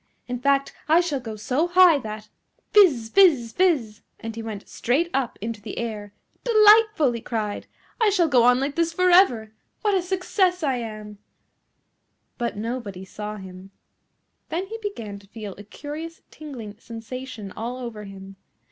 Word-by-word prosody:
In 250 0 -4
fact, 275 +1 +1 0.2
I 325 +2 +6
shall 330 -6 -1
go 225 -3 -7
so 255 +10 0
high 355 -3 +6
that 215 -2 -7 0.2
" - - -45
Fizz! 290 - +5
Fizz! 285 - +4
Fizz! 280 - +1 0.2
and 225 0 -6
he 230 - -5
went 215 -3 -7
straight 310 +9 0
up 265 -4 -1
into 220 0 -5
the 215 - -8
air. 215 -3 -4 0.3
"Delightful," 430 - +5
he 235 -1 -5
cried, 215 -3 -4 0.3
"I 440 - +5
shall 365 -4 +3
go 260 -5 +4
on 245 +1 +5
like 275 +1 -1
this 335 0 +1
for 365 +2 +2
ever. 240 - +4 0.3
What 415 -1 +2
a 380 - +2
success 365 0 0
I 270 -4 +1
am!" 215 -3 -7 1.2
But 235 -3 -2
nobody 215 -4 -5
saw 210 +2 -6
him. 190 -1 -11 0.8
Then 350 +4 -2
he 450 +3 -7
began 230 - -6
to 200 - -20
feel 210 -1 -8
a - - -9
curious 305 +9 -8
tingling 235 -9 -9
sensation 230 -2 -8
all 235 +5 -5
over 235 -4 -7
him. 195 0 -11
245 Hz, 165 wpm, -24 LUFS, 215-335 Hz, 1.2 s, I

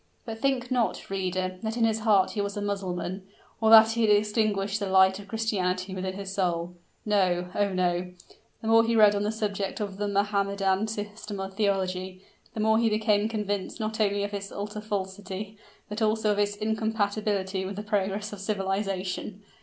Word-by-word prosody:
But 225 -2 -6
think 260 -2 0
not, 245 -5 0
reader, 185 -1 -2
that 220 +1 -3
in 235 - +2
his 220 -1 +1
heart 210 -4 +3
he 210 - -2
was 200 0 -3
a - - -1
Mussulman, 190 -2 -3 0.4
or 220 - +4
that 225 0 +9
he 230 +1 -1
had 220 - +3
extinguished 210 -1 +2
the 200 -2 -2
light 190 0 +5
of 200 - -11
Christianity 190 -4 -1
within 185 0 -3
his 195 -1 -6
soul. 175 -3 -1 0.3
No 180 -4 +1
oh! 205 -1 +1
no; 180 -1 0 0.5
the - - -3
more 225 0 +6
he 230 0 +1
read 210 -2 +7
on 200 - -1
the 210 +1 0
subject 205 -3 -3
of 200 -2 -4
the 205 0 -1
Mohammedan 200 0 +1
system 210 -1 -5
of 195 0 -5
theology, 190 -2 -1 0.3
the - - -4
more 220 +1 +3
he 230 -1 +3
became 215 0 +2
convinced 205 -2 -3
not 220 0 -3
only 200 -1 +1
of 205 0 -4
its 200 0 -5
utter 210 +1 -5
falsity, 200 0 -5 0.3
but 210 +2 -5
also 215 0 +2
of 205 - 0
its 205 0 +1
incompatibility 210 -3 -1
with 195 +1 -5
the 205 - -5
progress 210 0 -1
of 205 - -8
civilization. 195 0 -2
205 Hz, 185 wpm, -27 LUFS, 190-215 Hz, 0.5 s, that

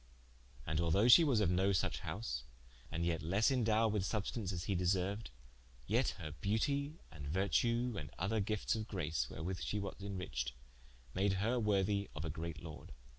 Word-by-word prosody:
And 80 +1 0
although 85 +7 +3
she 145 +7 +10
was 130 -8 +3
of 90 -4 +3
no 95 +2 +3
suche 85 - 0
house, - - -4 0.5
and 85 +1 -1
yet 85 -2 0
lesse 100 - +2
indowed 115 -3 +3
with 105 -3 +1
substaunce, 105 0 -2
as 85 -2 -3
he 100 - 0
deserued, 95 +4 0 0.6
yet - - +1
her 75 - -6
beautie 140 +9 0
and 75 -4 -8
vertue, 115 - +1
and 75 -3 -7
other 100 +4 0
giftes 105 +2 0
of 110 -1 -4
grace, 80 - -1
wherewith 90 +4 -4
she 105 - -1
was 100 -1 -4
inriched, 90 -12 -3 0.6
made 95 +1 +2
her 110 +6 +1
worthie 100 -2 +1
of 75 +2 -4
a 80 - -2
great 80 0 -5
lorde. 80 -2 -9
95 Hz, 175 wpm, -36 LUFS, 85-110 Hz, 0.6 s, she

